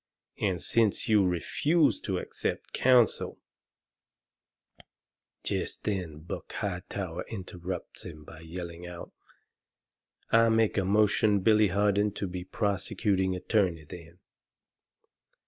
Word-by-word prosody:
And 95 Hz, -4 st, 0 dB
since 110 Hz, +1 st, +1 dB
you 105 Hz, -2 st, +5 dB
refuse 145 Hz, -, +2 dB
to 95 Hz, -3 st, -2 dB
accept -, -, -4 dB
counsel 125 Hz, -3 st, +3 dB, 0.9 s
" -, -, -32 dB
Jest -, -, -2 dB
then 90 Hz, -7 st, -3 dB
Buck 80 Hz, -, -7 dB
Hightower 90 Hz, -2 st, -4 dB
interrupts 90 Hz, -3 st, -6 dB
him 75 Hz, -2 st, -9 dB
by 80 Hz, +1 st, -12 dB
yelling 85 Hz, +1 st, -7 dB
out, 90 Hz, -1 st, -9 dB, 1.2 s
"I 115 Hz, 0 st, +6 dB
make 110 Hz, -1 st, +3 dB
a 95 Hz, -, 0 dB
motion 105 Hz, 0 st, +3 dB
Billy 110 Hz, +1 st, +5 dB
Harden 100 Hz, +2 st, +2 dB, 0.2 s
be 90 Hz, 0 st, -4 dB
prosecuting 95 Hz, -1 st, 0 dB
attorney, 90 Hz, -3 st, 0 dB
then. 85 Hz, +2 st, -11 dB
95 Hz, 105 wpm, -29 LUFS, 90-105 Hz, 1.2 s, I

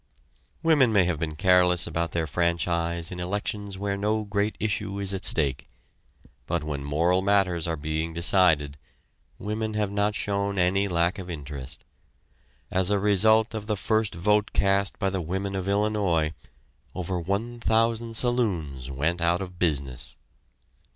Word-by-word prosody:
Women 150 Hz, -7 st, +4 dB
may 100 Hz, -3 st, +4 dB
have 85 Hz, -4 st, -1 dB
been 80 Hz, -2 st, -3 dB
careless 90 Hz, 0 st, +3 dB
about 85 Hz, -1 st, -2 dB
their 80 Hz, 0 st, -1 dB
franchise 85 Hz, +1 st, -1 dB
in 90 Hz, -, -6 dB
elections 100 Hz, +2 st, -3 dB
where 100 Hz, 0 st, -2 dB
no 105 Hz, +2 st, 0 dB
great 100 Hz, +1 st, -1 dB
issue 100 Hz, -1 st, -2 dB
is 100 Hz, -1 st, -1 dB
at 95 Hz, -, -4 dB
stake, 70 Hz, -4 st, +2 dB, 0.8 s
but 85 Hz, -2 st, -1 dB
when 75 Hz, -2 st, -4 dB
moral 85 Hz, +6 st, +1 dB
matters 95 Hz, -4 st, +1 dB
are 80 Hz, -, -1 dB
being 80 Hz, +2 st, -3 dB
decided 80 Hz, -4 st, +2 dB, 0.6 s
women 110 Hz, +1 st, -3 dB
have 105 Hz, -2 st, -1 dB
not 105 Hz, +1 st, 0 dB
shown 100 Hz, -1 st, -1 dB
any 95 Hz, +2 st, +2 dB
lack 85 Hz, 0 st, 0 dB
of 90 Hz, -1 st, -8 dB
interest. 70 Hz, -4 st, -7 dB, 0.9 s
As 95 Hz, 0 st, +3 dB
a 105 Hz, -, +3 dB
result 110 Hz, +3 st, +3 dB
of 105 Hz, -2 st, -5 dB
the 105 Hz, -2 st, -1 dB
first 110 Hz, -1 st, 0 dB
vote 105 Hz, +4 st, +1 dB
cast 100 Hz, 0 st, +1 dB
by 95 Hz, -, 0 dB
the 95 Hz, -1 st, -2 dB
women 95 Hz, +4 st, -3 dB
of 95 Hz, 0 st, -3 dB
Illinois 100 Hz, -6 st, +1 dB, 0.6 s
over 90 Hz, 0 st, -2 dB
one 100 Hz, +7 st, -3 dB
thousand 115 Hz, 0 st, +1 dB
saloons 90 Hz, -, -1 dB
went 80 Hz, +6 st, -1 dB
out 85 Hz, +1 st, +2 dB
of 90 Hz, -2 st, -8 dB
business. 70 Hz, -7 st, -2 dB
95 Hz, 150 wpm, -26 LUFS, 85-105 Hz, 0.9 s, Women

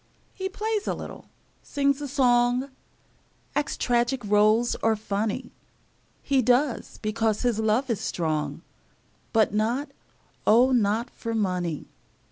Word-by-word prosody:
He 380 Hz, -1 st, -4 dB
plays 425 Hz, +1 st, -2 dB
a -, -, 0 dB
little, -, -, -9 dB, 0.4 s
sings 280 Hz, 0 st, 0 dB
a 290 Hz, -, -3 dB
song, 250 Hz, -1 st, +2 dB, 0.8 s
Acts 295 Hz, -1 st, -1 dB
tragic 240 Hz, 0 st, 0 dB
roles 215 Hz, +3 st, +3 dB
or 225 Hz, 0 st, +3 dB
funny; 215 Hz, +3 st, -3 dB, 0.7 s
He 275 Hz, -2 st, +2 dB
does, 250 Hz, +2 st, +1 dB
because 215 Hz, 0 st, 0 dB
his 240 Hz, -3 st, +1 dB
love 220 Hz, +5 st, +1 dB
is 225 Hz, -5 st, -1 dB
strong, 155 Hz, -4 st, -2 dB, 0.7 s
But 220 Hz, -2 st, +3 dB
not, 240 Hz, +7 st, 0 dB, 0.6 s
oh, 245 Hz, +5 st, +6 dB
not 230 Hz, 0 st, +1 dB
for 230 Hz, -1 st, -5 dB
money! 180 Hz, -7 st, -1 dB
235 Hz, 120 wpm, -26 LUFS, 215-265 Hz, 0.8 s, oh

